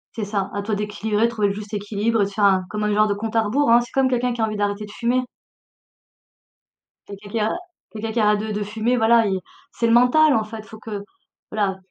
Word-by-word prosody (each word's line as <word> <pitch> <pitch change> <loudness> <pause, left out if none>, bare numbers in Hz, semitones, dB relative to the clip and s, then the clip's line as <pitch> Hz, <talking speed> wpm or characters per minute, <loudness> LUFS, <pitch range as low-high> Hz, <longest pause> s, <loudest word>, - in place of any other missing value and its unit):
C'est 220 - -3
ça, 200 -2 -2
à 205 - -1
toi 215 +1 -2
d'équilibrer, 210 +1 -1
de - - +2
trouver 215 -3 0
le - - -1
juste 210 +1 -9
équilibre 210 +2 0
et - - +3
de - - -5
faire 205 +1 -2
un 190 -2 +4
comme 210 0 -3
un 210 - +1
genre 215 +1 +4
de 205 - +1
compte 220 +2 -5
à 225 - +4
rebours, 250 +6 +1
hein. 235 - +7
C'est 240 - -9
comme 265 -1 +2
quelqu'un 250 -1 0
qui 235 - -4
a - - +4
envie 215 -1 -4
d'arrêter 205 0 -1
de 205 - -12
fumer. 240 +4 0 1.9
Que - - -9
quelqu'un 210 +1 -1 0.4
que 220 - -8
quelqu'un 220 0 0
arrête 210 0 +3
de 215 +1 -4
de 210 0 -2
fumer, 220 +4 -1
voilà, 230 0 +4
i 190 -1 0 0.3
c'est 235 - -1
le 230 - +3
mental, 275 +5 +5
en 220 - +2
fait. 215 0 -8
Faut 220 +1 -12
que 210 -2 -6 0.5
voilà, 200 -3 0
215 Hz, 245 wpm, -22 LUFS, 205-230 Hz, 1.9 s, hein